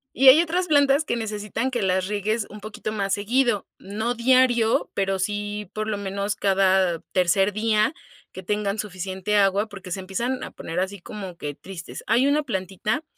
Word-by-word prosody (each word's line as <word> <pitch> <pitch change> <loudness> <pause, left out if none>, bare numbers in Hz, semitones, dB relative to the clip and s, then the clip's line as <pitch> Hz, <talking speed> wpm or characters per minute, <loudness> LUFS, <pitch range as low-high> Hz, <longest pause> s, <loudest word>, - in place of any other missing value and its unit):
Y 270 - +4
hay 270 +5 +10
otras 350 +2 -1
plantas 285 -1 +4
que - - -1
necesitan 220 +2 -3
que 240 -5 -2
las 185 0 +1
riegues 210 +1 -1
un 210 0 -10
poquito 215 0 -5
más 200 -2 -1
seguido, 230 +1 +1
no 220 +5 -3
diario, 245 -2 +3
pero 195 -1 0
sí 205 +1 -3
por 215 0 -3
lo 215 -1 -1
menos 200 +1 -2
cada 190 -3 +2
tercer 190 +3 +2
día, 215 +4 +2 0.4
que 185 - -8
tengan 205 +2 -1
suficiente 190 0 -3
agua 200 +1 +3
porque 195 -3 -10
se 190 - -2
empiezan 235 +8 -3
a - - -7
poner 165 +2 -5
así 190 +2 -2
como 190 -1 -8
que 145 -2 -5
tristes. 175 +3 -9
Hay 235 +4 +4
una 290 +2 +3
plantita 210 - -2
205 Hz, 180 wpm, -24 LUFS, 190-235 Hz, 0.4 s, hay